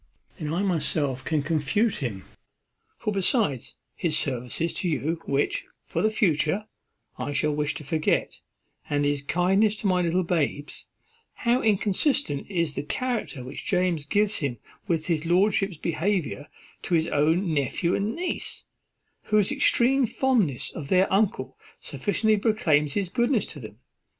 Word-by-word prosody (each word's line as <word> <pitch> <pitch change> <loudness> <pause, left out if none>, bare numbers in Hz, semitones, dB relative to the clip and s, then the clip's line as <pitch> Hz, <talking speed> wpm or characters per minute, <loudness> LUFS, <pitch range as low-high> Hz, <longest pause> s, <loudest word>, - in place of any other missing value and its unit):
"Then 155 -2 -3
I 175 +5 0
myself 150 -7 0
can 155 -1 0
confute 165 - +1
him," 110 -8 -4
replied - - -24
Amelia: - - -40
"for, 215 - -2
besides 195 - +1 0.2
his 160 -3 0
services 130 +5 -2
to 180 - -1
you, 160 +2 -1
which, 145 - 0 0.2
for - - -2
the 215 - +3
future, 195 -2 +1 0.5
I 145 - -3
shall 150 +1 +2
wish 150 0 -1
to - - -7
forget, 155 +2 0 0.5
and 145 0 +1
his 145 -1 0
kindness 195 +8 +2
to 215 - -7
my 185 -2 +3
little 175 +2 +1
babes, 150 -4 -2 0.6
how 240 +2 +3
inconsistent 210 - +1
is 170 -6 0
the - - -3
character 225 - -3
which 125 - -7
James 180 -5 +1
gives 205 +7 +2
of - - -3
him 140 -7 -2 0.3
with 165 -4 0
his 165 -2 -1
lordship's 195 0 +2
behaviour 165 -3 -1 0.3
to 175 - 0
his 160 0 +2
own 160 +4 +2
nephew 155 +5 0
and 210 +3 -1
niece, 360 +1 -3 0.6
whose 215 0 +2
extreme 270 -2 +3
fondness 220 - +1
of 150 -4 -7
their 185 +3 +3
uncle 205 0 0 0.2
sufficiently 215 +1 0
proclaims 160 -10 +2
his 200 -2 -1
goodness 240 +3 +1
to 150 - -8
them? 110 -4 -10
170 Hz, 155 wpm, -26 LUFS, 150-210 Hz, 0.6 s, the